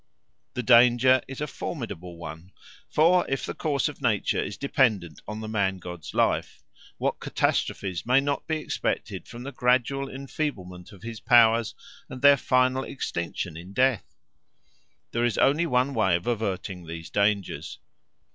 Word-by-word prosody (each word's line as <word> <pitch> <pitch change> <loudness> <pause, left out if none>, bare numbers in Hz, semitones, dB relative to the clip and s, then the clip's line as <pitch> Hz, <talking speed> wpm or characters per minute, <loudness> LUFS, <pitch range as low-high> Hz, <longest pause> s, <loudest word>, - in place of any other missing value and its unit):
The 125 - -2
danger 120 +2 +6
is 135 +1 -7
a - - 0
formidable 100 - -6
one; 85 +3 -9 0.4
for 175 +4 +4
if 135 - -1
the - - -4
course 145 -2 0
of 145 -1 -8
nature 110 -6 +1
is 100 - -6
dependent 110 - +1
on 105 +1 -5
the 110 - -5
man 100 -3 0
god's 90 -4 -9
life, - - 0 0.3
what - - -1
catastrophes 95 -3 -1
may 125 +3 +4
not 140 0 -2
be 160 - 0
expected 155 - -3
from 120 +1 -9
the 140 - -6
gradual 130 +2 +1
enfeeblement 120 - -5
of 100 -1 -15
his 115 -1 -6
powers 115 -1 +4 0.3
and 130 +1 -9
their 140 0 +9
final 130 +1 +2
extinction 85 - -4
in 90 +4 -10
death? 130 0 +1 1.0
There 115 - 0
is 120 -3 +1
only 155 +5 +3
one 130 0 +1
way 100 -7 +2
of 85 - -3
averting 100 -6 -3
these 80 0 -8
dangers. 100 -1 0
115 Hz, 155 wpm, -26 LUFS, 95-135 Hz, 1.0 s, their